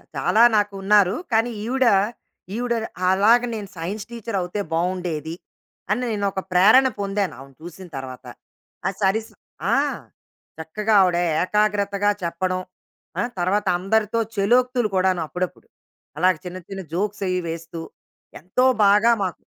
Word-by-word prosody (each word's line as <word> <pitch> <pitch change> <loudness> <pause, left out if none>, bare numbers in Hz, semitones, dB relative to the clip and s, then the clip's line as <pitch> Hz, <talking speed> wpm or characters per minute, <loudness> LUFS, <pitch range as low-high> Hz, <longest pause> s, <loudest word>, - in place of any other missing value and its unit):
చాలా 225 - +3
నాకు 205 -1 +1
ఉన్నారు. 200 0 +4 0.2
కానీ 225 +2 +2
ఈవిడ, 260 +2 +1 0.7
ఈవిడ 240 +1 -1 0.4
అలాగా 225 +6 +4
నేను 205 -3 -6
సైన్స్ 195 +6 -5
టీచర్ 230 -3 -4
అవుతే 180 +4 -3
బాగుండేది, 170 -2 -2 0.6
అని 215 +4 +1
నేను 205 -2 -1
ఒక 190 - -3
ప్రేరణ 205 +9 +6
పొందాను, 200 -1 -1
ఆమెను 135 0 -14
చూసిన 175 +2 -10
తర్వాత. 130 -1 -8 0.6
ఆ - - +2
సరి 200 +3 +2 0.5
ఆ! - - +5 0.8
చక్కగా 210 +7 -2
ఆవిడ 180 -2 +3 0.2
ఏకాగ్రతగా 205 0 +1
చెప్పడం. 185 +2 -1 0.6
ఆ! - - +2 0.2
తర్వాత 195 +4 +1
అందరితో 215 +3 +1 0.2
చలోక్తులు 245 +3 +2
కూడాను, 185 -1 +2
అప్పుడప్పుడు. 180 +3 -5 0.5
అలాగ 185 +1 +4
చిన్న 180 +1 -6
చిన్న 195 -1 -5
జోక్స్ 205 +2 -2
అవి 185 0 0
వేస్తూ, 165 0 -6 0.6
ఎంతో 185 +10 0 0.2
బాగా 205 +4 +5
మాకు 185 -3 -2
195 Hz, 130 wpm, -22 LUFS, 180-215 Hz, 0.8 s, ప్రేరణ